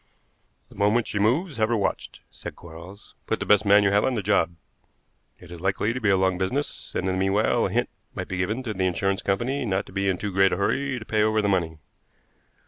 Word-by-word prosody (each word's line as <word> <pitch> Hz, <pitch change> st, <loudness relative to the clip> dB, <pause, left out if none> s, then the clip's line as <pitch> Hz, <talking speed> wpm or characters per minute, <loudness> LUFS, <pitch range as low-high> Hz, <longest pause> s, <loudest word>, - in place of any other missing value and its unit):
"The -, -, -17 dB
moment 105 Hz, +4 st, +2 dB
she 100 Hz, -, -2 dB
moves 140 Hz, -, +1 dB
have 110 Hz, 0 st, +1 dB
her 120 Hz, -, +2 dB
watched," 100 Hz, -, -3 dB
said -, -, -9 dB
Quarles. 85 Hz, +5 st, -13 dB
"Put -, -, -1 dB
the -, -, -3 dB
best 105 Hz, 0 st, +4 dB
man 100 Hz, +1 st, +6 dB
you 100 Hz, -, +3 dB
have 100 Hz, +1 st, +3 dB
on 130 Hz, -, +1 dB
to -, -, -2 dB
the 105 Hz, -, -2 dB
job. 90 Hz, -4 st, +1 dB, 0.8 s
It 85 Hz, -, -15 dB
is 85 Hz, -1 st, -9 dB
likely 95 Hz, +4 st, 0 dB
to 130 Hz, -, -5 dB
be 105 Hz, -, +2 dB
a 95 Hz, -, +4 dB
long 95 Hz, -1 st, +1 dB
business, 130 Hz, +10 st, -3 dB
and 95 Hz, -, -1 dB
in 95 Hz, -, 0 dB
the 95 Hz, -, -1 dB
meanwhile 95 Hz, +3 st, +2 dB
a -, -, -6 dB
hint -, -, 0 dB, 0.3 s
might -, -, -4 dB
be 95 Hz, -, -4 dB
given 105 Hz, +8 st, -1 dB
to 110 Hz, -4 st, -3 dB
the 95 Hz, -1 st, 0 dB
insurance 95 Hz, +2 st, -1 dB
company 125 Hz, +8 st, -1 dB
not 100 Hz, -3 st, -1 dB
to -, -, -14 dB
be 95 Hz, +1 st, -1 dB
in 95 Hz, -, 0 dB
too 105 Hz, +1 st, -4 dB
great 95 Hz, 0 st, +4 dB
a -, -, -1 dB
hurry 135 Hz, +7 st, 0 dB
to 110 Hz, -, -8 dB
pay 110 Hz, -1 st, +1 dB
over 110 Hz, 0 st, +2 dB
the 105 Hz, -, +1 dB
money." 85 Hz, -5 st, 0 dB
100 Hz, 250 wpm, -25 LUFS, 95-110 Hz, 0.8 s, man